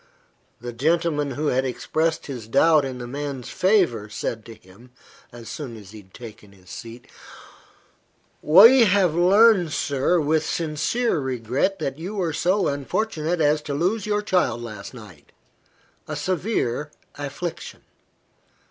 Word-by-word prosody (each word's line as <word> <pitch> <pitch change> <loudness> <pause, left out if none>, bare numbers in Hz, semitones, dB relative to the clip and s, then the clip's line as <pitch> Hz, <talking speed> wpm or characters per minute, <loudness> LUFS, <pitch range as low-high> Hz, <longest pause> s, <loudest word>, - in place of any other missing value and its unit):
The 120 0 -7
gentleman 150 +2 0
who 150 +3 -1
had 130 +1 +1
expressed 160 +5 -1
the 135 -4 -6
doubt 150 +4 +4
in 130 -1 -5
the 120 - -7
man's 140 0 -6
favour, 175 - +1
said 110 +1 -4
to 115 - -11
him, 110 +4 -19 0.4
as 120 -1 -11
soon 130 -7 -7
as 100 -3 -13
he 110 - -11
had 95 -1 -25
taken 105 -3 -12
his 95 -1 -17
seat 115 +3 -10 1.4
"We 225 +10 +8
have 190 -4 +3
learned, 185 0 +4
sir, 145 +5 0
with 155 +1 +1
sincere 170 +8 -1
regret, 130 - -1
that 140 -4 -4
you 185 +6 -6
were 175 -5 -1
so 185 +6 +1
unfortunate 160 +3 -2
as 150 0 +2
to 145 -1 -5
lose 195 +8 -1
your 210 0 0
child 130 - 0
last 105 0 -9
night 100 -11 -14 0.8
a 155 - -4
severe 150 - -2 0.3
affliction. 145 +4 -6
145 Hz, 140 wpm, -23 LUFS, 120-175 Hz, 1.4 s, We